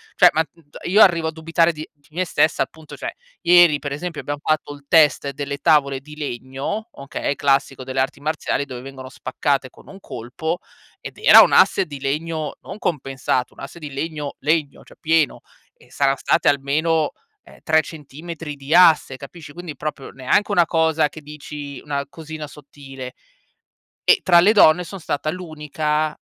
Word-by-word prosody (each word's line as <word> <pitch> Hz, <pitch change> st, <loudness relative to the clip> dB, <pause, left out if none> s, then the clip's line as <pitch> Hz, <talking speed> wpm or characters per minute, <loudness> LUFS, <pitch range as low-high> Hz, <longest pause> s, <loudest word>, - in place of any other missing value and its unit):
Cioè -, -, +7 dB
ma 160 Hz, -, +3 dB
n -, -, -2 dB, 0.2 s
t -, -, -12 dB
io 200 Hz, +5 st, +4 dB
arrivo 170 Hz, -5 st, +5 dB
a -, -, -1 dB
dubitare 165 Hz, +1 st, +1 dB
di 155 Hz, 0 st, -8 dB
di 145 Hz, -2 st, -30 dB
me 185 Hz, +1 st, 0 dB
stessa 155 Hz, -2 st, +2 dB
appunto 160 Hz, -1 st, -12 dB
cioè -, -, -5 dB, 0.3 s
ieri 175 Hz, -3 st, +6 dB
per 145 Hz, 0 st, -6 dB
esempio 160 Hz, +3 st, -5 dB
abbiam 145 Hz, 0 st, -4 dB
fatto 155 Hz, -1 st, -1 dB
il 145 Hz, -1 st, -15 dB
test 150 Hz, -3 st, +4 dB
delle 140 Hz, +1 st, -5 dB
tavole 140 Hz, -4 st, +3 dB
di 150 Hz, +3 st, -13 dB
legno, 140 Hz, -, -5 dB
okay, 140 Hz, +1 st, -4 dB
classico 135 Hz, -1 st, +1 dB
delle 130 Hz, +1 st, -3 dB
arti 130 Hz, +1 st, -1 dB
marziali 150 Hz, -1 st, -2 dB
dove 125 Hz, -3 st, -8 dB
vengono 130 Hz, 0 st, -9 dB
spaccate 135 Hz, +1 st, -2 dB
con -, -, -19 dB
un 195 Hz, -, -12 dB
colpo 130 Hz, +4 st, -5 dB, 0.4 s
ed -, -, -10 dB
era 455 Hz, -, +9 dB
un -, -, +4 dB
asse -, -, +5 dB
di 145 Hz, -4 st, -9 dB
legno 155 Hz, +2 st, -3 dB
non 195 Hz, -, -9 dB
compensato, 135 Hz, -6 st, -2 dB
un -, -, -18 dB
asse 135 Hz, +5 st, -9 dB
di 150 Hz, -4 st, -8 dB
legno 150 Hz, 0 st, -4 dB
legno, 150 Hz, -1 st, -1 dB
cioè -, -, -18 dB
pieno, 160 Hz, -3 st, +1 dB, 0.3 s
e -, -, -24 dB
sarà 135 Hz, -1 st, +2 dB
state -, -, +1 dB
almeno, 150 Hz, +3 st, +1 dB, 0.3 s
ehm, -, -, -17 dB
3 160 Hz, 0 st, +4 dB
centimetri 155 Hz, +1 st, -8 dB
di 140 Hz, +3 st, -1 dB
asse, 160 Hz, -6 st, +5 dB
capisci. 145 Hz, +3 st, -11 dB
Quindi 170 Hz, -1 st, -8 dB
proprio, 150 Hz, -3 st, -6 dB
neanche 135 Hz, +11 st, 0 dB
una 175 Hz, -4 st, +4 dB
cosa, 160 Hz, -2 st, +2 dB
che 155 Hz, -, -11 dB
dici 145 Hz, -1 st, -9 dB
una 140 Hz, -1 st, -3 dB
cosina 155 Hz, +1 st, -8 dB
sottile, 135 Hz, -3 st, -11 dB, 0.9 s
e 445 Hz, -, +4 dB
tra 175 Hz, -2 st, +6 dB
le 200 Hz, +5 st, +5 dB
donne 160 Hz, -4 st, +6 dB
son 195 Hz, +3 st, -8 dB
stata 150 Hz, -2 st, -3 dB
l'unica 155 Hz, -2 st, -2 dB
150 Hz, 180 wpm, -21 LUFS, 140-165 Hz, 0.9 s, era